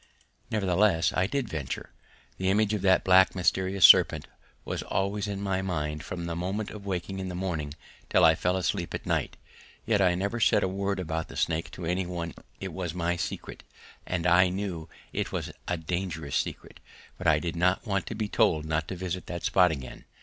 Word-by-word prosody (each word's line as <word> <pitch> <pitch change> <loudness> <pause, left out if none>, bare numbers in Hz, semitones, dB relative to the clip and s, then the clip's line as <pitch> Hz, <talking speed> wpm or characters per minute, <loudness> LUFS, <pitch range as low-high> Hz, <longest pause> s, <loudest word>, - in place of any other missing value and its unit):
Nevertheless 95 -4 +2
I 90 +1 +1
did 140 -1 -2
venture. 75 -9 -5 0.5
The 95 0 +1
image 105 +2 +2
of 105 - -1
that 95 -1 +4
black 95 0 +5
mysterious 95 0 +3
serpent - - +7 0.4
was - - -3
always 100 +2 -1
in 100 -1 -3
my 95 -1 -1
mind 75 -5 -3
from 85 -1 -5
the 85 -1 -3
moment 95 +5 -3
of 100 -2 -9
waking 95 +1 -3
in 95 -1 -4
the 90 - -5
morning 80 -6 -3 0.3
until - - +3
I 80 - +7
fell 90 +3 0
asleep 90 -5 -1
at - - -7
night. - - -1 0.5
Yet 105 -3 +2
I 90 -2 +4
never 100 +6 -2
said - - +4
a - - +2
word 100 +1 -2
about 80 -2 -3
the - - -10
snake 80 0 0
to 90 - -6
any 90 +2 -1
one: 85 -2 -4 0.3
it 95 -3 -5
was 90 -2 -4
my 85 0 0
secret, 90 - -5 0.5
and 90 -3 -2
I 90 +1 +5
knew 90 -4 -4 0.2
it - - -2
was - - -3 0.2
a 90 - 0
dangerous 80 -3 -3
secret, - - -3 0.4
but 90 - -2
I 75 -2 +5
did 85 +2 -3
not 90 +5 +1
want 100 -4 -1
to 110 - -4
be 110 -1 -2
told 80 -6 +2
not 80 +1 -1
to 95 - -4
visit 90 0 -4
that 85 -1 -5
spot 90 -2 +4
again. 70 -6 -7
90 Hz, 200 wpm, -28 LUFS, 85-95 Hz, 0.5 s, serpent